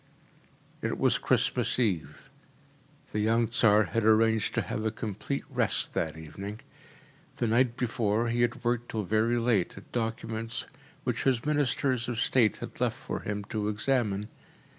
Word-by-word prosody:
It -, -, -2 dB
was -, -, +3 dB
Christmas -, -, +1 dB
Eve. 85 Hz, -, -2 dB, 0.8 s
The 105 Hz, -, -1 dB
young 115 Hz, +2 st, +2 dB
Tsar 110 Hz, -2 st, +5 dB
had 115 Hz, +2 st, -1 dB
arranged 110 Hz, 0 st, +3 dB
to -, -, +1 dB
have 110 Hz, -, -3 dB
a 110 Hz, -, +1 dB
complete 110 Hz, +5 st, -4 dB
rest -, -, +1 dB
that 80 Hz, -1 st, -2 dB
evening. 100 Hz, -, -7 dB, 0.7 s
The 125 Hz, -, -1 dB
night 120 Hz, +1 st, +2 dB
before 115 Hz, -1 st, 0 dB
he 120 Hz, +1 st, 0 dB
had 120 Hz, +1 st, 0 dB
worked 120 Hz, 0 st, 0 dB
till 110 Hz, -1 st, -2 dB
very 110 Hz, +5 st, +2 dB
late 115 Hz, -7 st, +1 dB
at 95 Hz, -, -13 dB
documents 115 Hz, 0 st, -3 dB, 0.4 s
which 125 Hz, -2 st, -2 dB
his 130 Hz, -2 st, +2 dB
ministers 135 Hz, -4 st, +1 dB
of 120 Hz, -2 st, -2 dB
state 120 Hz, -4 st, +3 dB
had -, -, -8 dB
left -, -, +1 dB
for -, -, -5 dB
him 105 Hz, -1 st, -4 dB
to 105 Hz, -2 st, -1 dB
examine. 105 Hz, -2 st, 0 dB
115 Hz, 155 wpm, -29 LUFS, 105-120 Hz, 0.8 s, Tsar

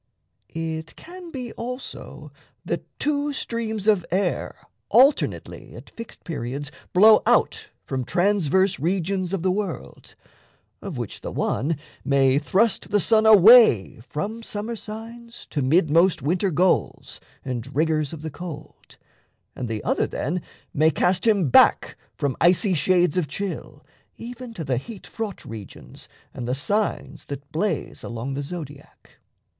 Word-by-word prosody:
It 160 Hz, 0 st, -4 dB
can 355 Hz, 0 st, -11 dB
be 255 Hz, -6 st, -6 dB
also 250 Hz, +2 st, -8 dB, 0.3 s
that -, -, -3 dB
two 290 Hz, 0 st, -1 dB
streams 225 Hz, -5 st, -3 dB
of 205 Hz, -5 st, +4 dB
air 190 Hz, +3 st, -1 dB, 0.3 s
Alternately 275 Hz, +4 st, +2 dB
at -, -, -12 dB
fixed 230 Hz, -1 st, -10 dB
periods 140 Hz, -2 st, -5 dB, 0.2 s
Blow 215 Hz, +4 st, +7 dB
out -, -, +2 dB, 0.2 s
from 130 Hz, -1 st, -3 dB
transverse 190 Hz, -, +1 dB
regions 185 Hz, +3 st, -1 dB
of 195 Hz, -4 st, -2 dB
the 185 Hz, -, +2 dB
world, 195 Hz, -2 st, -5 dB, 0.7 s
Of -, -, -6 dB
which -, -, -6 dB
the -, -, -5 dB
one 150 Hz, +5 st, -1 dB, 0.3 s
may 135 Hz, 0 st, +3 dB
thrust 200 Hz, +8 st, +1 dB
the 205 Hz, -, +2 dB
sun 220 Hz, +3 st, +4 dB
away 215 Hz, -, +7 dB
From 200 Hz, -, -5 dB
summer 220 Hz, +1 st, -5 dB
signs 230 Hz, +2 st, -9 dB
to 145 Hz, -, -1 dB
mid 155 Hz, +4 st, +2 dB
most 170 Hz, -1 st, +3 dB
winter 180 Hz, +6 st, +1 dB
goals 165 Hz, -, 0 dB, 0.3 s
And 130 Hz, +1 st, -5 dB
rigors 155 Hz, -1 st, +1 dB
of 155 Hz, -2 st, -9 dB
the 160 Hz, -, -5 dB
cold, 155 Hz, -3 st, -10 dB, 0.6 s
and 125 Hz, -, -4 dB
the 110 Hz, -2 st, -4 dB
other -, -, +1 dB
then 170 Hz, +7 st, -3 dB, 0.3 s
May 155 Hz, +2 st, +4 dB
cast 180 Hz, +5 st, +1 dB
him 200 Hz, -9 st, +3 dB
back -, -, +5 dB, 0.2 s
from 140 Hz, -2 st, -1 dB
icy 185 Hz, +3 st, +4 dB
shades 180 Hz, 0 st, +2 dB
of 175 Hz, -5 st, +1 dB
chill 195 Hz, +6 st, -6 dB, 0.3 s
Even 245 Hz, +1 st, -8 dB
to 165 Hz, -, -5 dB
the 130 Hz, -3 st, 0 dB
heat 205 Hz, -, -8 dB
fraught 220 Hz, -3 st, -6 dB
regions 110 Hz, -4 st, -10 dB, 0.2 s
and 120 Hz, -, -6 dB
the 125 Hz, -, 0 dB
signs 205 Hz, +9 st, -2 dB
That 140 Hz, 0 st, -8 dB
blaze 170 Hz, +1 st, -2 dB
along 120 Hz, +3 st, -5 dB
the 140 Hz, -, -3 dB
Zodiac. 145 Hz, -2 st, -10 dB
180 Hz, 140 wpm, -23 LUFS, 145-215 Hz, 0.7 s, Blow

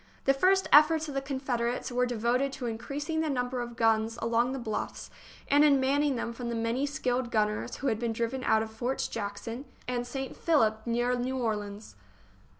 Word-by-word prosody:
The 270 Hz, -, +5 dB
first 380 Hz, +7 st, +3 dB
efforts 310 Hz, +1 st, +6 dB
of 290 Hz, -, -5 dB
the 275 Hz, -, -1 dB
Confederates 260 Hz, -3 st, -2 dB
were 250 Hz, 0 st, +1 dB
de 245 Hz, -1 st, -3 dB
voted 250 Hz, +5 st, +1 dB
to 255 Hz, -, -5 dB
increasing 275 Hz, +8 st, -3 dB
the 315 Hz, -, -1 dB
number 250 Hz, -2 st, -1 dB
of 240 Hz, 0 st, -6 dB
guns 225 Hz, 0 st, +2 dB
along 235 Hz, +2 st, +1 dB
the 270 Hz, -, -3 dB
bluffs 220 Hz, -4 st, -4 dB, 0.4 s
and 290 Hz, +1 st, +5 dB
in 285 Hz, -2 st, +5 dB
manning 280 Hz, +1 st, +2 dB
them 235 Hz, 0 st, -3 dB
from 235 Hz, 0 st, -5 dB
the 235 Hz, -, -2 dB
many 230 Hz, +5 st, 0 dB
skilled 255 Hz, -3 st, -1 dB
gunners 210 Hz, -2 st, 0 dB
who 275 Hz, -, -3 dB
had 220 Hz, -4 st, +1 dB
been 235 Hz, -1 st, -1 dB
driven 235 Hz, +3 st, -2 dB
out 220 Hz, 0 st, +3 dB
of 220 Hz, -, -7 dB
Forts 245 Hz, +4 st, -2 dB
Jackson 225 Hz, +5 st, -5 dB, 0.2 s
and 245 Hz, -1 st, -2 dB
St. 265 Hz, +1 st, -5 dB
Philip, 220 Hz, -10 st, +2 dB
near 240 Hz, +1 st, +1 dB
New 255 Hz, +2 st, -2 dB
Orleans. 210 Hz, -3 st, -3 dB
245 Hz, 195 wpm, -29 LUFS, 230-270 Hz, 0.4 s, efforts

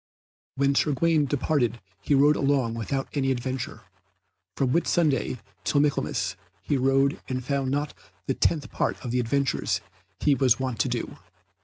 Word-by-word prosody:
When 140 Hz, +1 st, +2 dB
Sir 145 Hz, +1 st, +2 dB
Gawaine 155 Hz, +1 st, +2 dB
departed 130 Hz, -4 st, 0 dB, 0.2 s
he 145 Hz, -, +2 dB
rode 145 Hz, +2 st, +5 dB
long 135 Hz, -5 st, +1 dB
without 130 Hz, +4 st, -2 dB
any 135 Hz, -2 st, 0 dB
adventure. 130 Hz, 0 st, -3 dB, 0.8 s
From 130 Hz, -2 st, +1 dB
Whitsunday 155 Hz, -5 st, +1 dB, 0.3 s
to 145 Hz, -, +2 dB
Michaelmas 145 Hz, 0 st, 0 dB, 0.3 s
he 145 Hz, -, 0 dB
rode 135 Hz, +1 st, +2 dB
and 130 Hz, -1 st, -3 dB
found 140 Hz, -1 st, 0 dB
not 145 Hz, +2 st, -1 dB, 0.3 s
the -, -, 0 dB
tenth 155 Hz, -4 st, 0 dB
part -, -, -1 dB
of 120 Hz, -, -3 dB
the 125 Hz, -, +1 dB
adventures 135 Hz, +3 st, 0 dB, 0.4 s
he 145 Hz, -, +3 dB
was 130 Hz, -5 st, +3 dB
wont 130 Hz, -4 st, -3 dB
to -, -, +2 dB
do. -, -, -3 dB
135 Hz, 155 wpm, -26 LUFS, 130-145 Hz, 0.8 s, rode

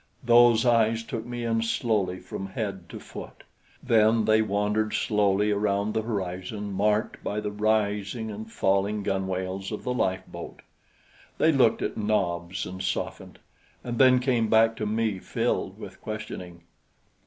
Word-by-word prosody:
Those 120 Hz, -1 st, +6 dB
eyes 115 Hz, -1 st, +3 dB
took 115 Hz, 0 st, -5 dB
me 120 Hz, -1 st, -4 dB
in 115 Hz, -1 st, +1 dB
slowly 110 Hz, -5 st, 0 dB
from 95 Hz, +1 st, -6 dB
head 95 Hz, -3 st, -5 dB
to -, -, -8 dB
foot; -, -, -10 dB, 0.4 s
then 110 Hz, 0 st, +4 dB
they 110 Hz, 0 st, +4 dB
wandered 105 Hz, +1 st, 0 dB
slowly 105 Hz, 0 st, +2 dB
around 100 Hz, 0 st, 0 dB
the 110 Hz, -, 0 dB
horizon 100 Hz, -1 st, -4 dB
marked 105 Hz, +2 st, 0 dB
by 105 Hz, -, -2 dB
the 105 Hz, -1 st, -3 dB
rising 105 Hz, +1 st, 0 dB
and 110 Hz, +2 st, -8 dB
falling 100 Hz, +1 st, +1 dB
gunwales 95 Hz, 0 st, -2 dB
of 105 Hz, -, -5 dB
the 125 Hz, -, -1 dB
lifeboat. 95 Hz, -6 st, -3 dB, 0.7 s
They 160 Hz, -, +4 dB
looked 130 Hz, -6 st, +3 dB
at -, -, -3 dB
Nobs 90 Hz, -4 st, -1 dB
and 95 Hz, 0 st, -7 dB
softened, 95 Hz, 0 st, -4 dB, 0.5 s
and 120 Hz, -1 st, -4 dB
then 130 Hz, -1 st, +7 dB
came 125 Hz, -3 st, +1 dB
back 115 Hz, +1 st, +4 dB
to 105 Hz, -, -2 dB
me 110 Hz, -2 st, 0 dB
filled -, -, -2 dB
with -, -, -10 dB
questioning. 90 Hz, -5 st, -7 dB
105 Hz, 145 wpm, -26 LUFS, 95-115 Hz, 0.7 s, then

